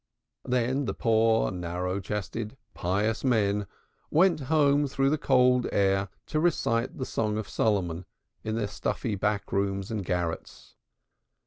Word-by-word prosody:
Then 125 +3 +1
the - - -3
poor 115 -1 +3
narrow 90 +1 -3
chested 105 +4 -4 0.2
pious 105 +6 -1
men 105 -5 +1 0.4
went 175 +1 +4
home 145 -2 +4
through 135 +1 +1
the 155 - +2
cold 125 -2 +3
air 95 0 +2 0.2
to 155 - -1
recite 150 -3 +1
the 130 - -3
Song 105 -3 -1
of 110 - -4
Solomon 95 -5 0 0.4
in 110 0 -2
their 115 -2 0
stuffy 110 +2 -3
back 100 +1 -1
rooms 100 0 -1
and 105 -3 -2
garrets. 85 -2 -4
110 Hz, 135 wpm, -28 LUFS, 100-125 Hz, 0.4 s, went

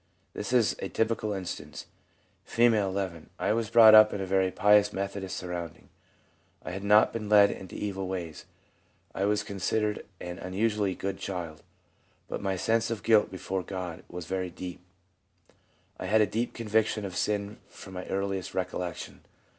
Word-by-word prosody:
This - - -5
is 120 -5 +3
a 95 - -4
typical 110 -1 0
instance: 95 -3 -6 0.6
F., - - -11
n. 100 -7 +1
'I - - +1
was 115 -1 -1
brought 115 -1 +8
up 110 0 +9
in 95 -1 -3
very 95 0 +2
pious 105 +2 +4
Methodist 100 -1 -4
surroundings. 90 -3 -6 0.8
I - - -4
had 95 +2 -5
not 105 +1 +5
been 110 -2 -4
led 100 -1 +7
into 95 - -9
evil 95 -2 -3
ways; 85 -5 -5 0.7
I 95 - -1
was 105 0 +1
considered 105 +2 -1 0.2
an 90 0 -7
unusually 100 +1 0
good 95 0 -4
child; 85 -5 -5 0.7
but - - -5
my 95 -1 -1
sense 115 +4 +1
of 115 -2 -4
guilt 110 -2 +4
before 95 0 -3
God 90 -2 -6
was 90 -1 -7
very 95 0 -2
deep. 90 0 -8 1.2
I - - -4
had 110 +3 +4
a - - +5
deep 115 +3 -3
conviction 110 -2 0
of 95 -2 -6
sin 105 +1 -1
from 95 - -12
my 90 0 -6
earliest 95 -1 -3
recollection. 90 -2 -4
100 Hz, 160 wpm, -28 LUFS, 95-105 Hz, 1.2 s, up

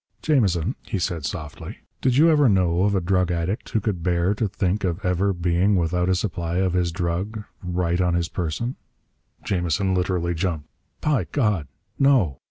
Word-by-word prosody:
"Jamison," 105 - +2
he 105 - -4
said 85 -3 -2
softly, 80 -5 -6 0.2
"did 130 -1 +2
you 160 +3 +6
ever 145 -4 +5
know 90 -2 +2
of 100 0 +2
a - - +3
drug 90 0 +1
addict 85 +4 -2
who 110 - +1
could 100 -4 -2
bear 90 +2 +1
to 105 +1 -1
think 95 +1 -1
of 95 +2 -2
ever 90 +2 +2
being 90 +3 +1
without 90 +1 +1
a 95 - +3
supply 85 -3 -2
of 95 -1 +1
his 90 -2 +1
drug 90 +5 -3 0.2
right 90 -1 0
on 90 -1 +2
his 85 -1 0
person?" 90 +11 -3 0.7
Jamison 95 +1 0
literally 90 -1 0
jumped. 80 -3 -2 0.3
"By 140 - +1
God! 105 - 0 0.3
No!" 125 - +3
90 Hz, 175 wpm, -23 LUFS, 85-100 Hz, 0.7 s, you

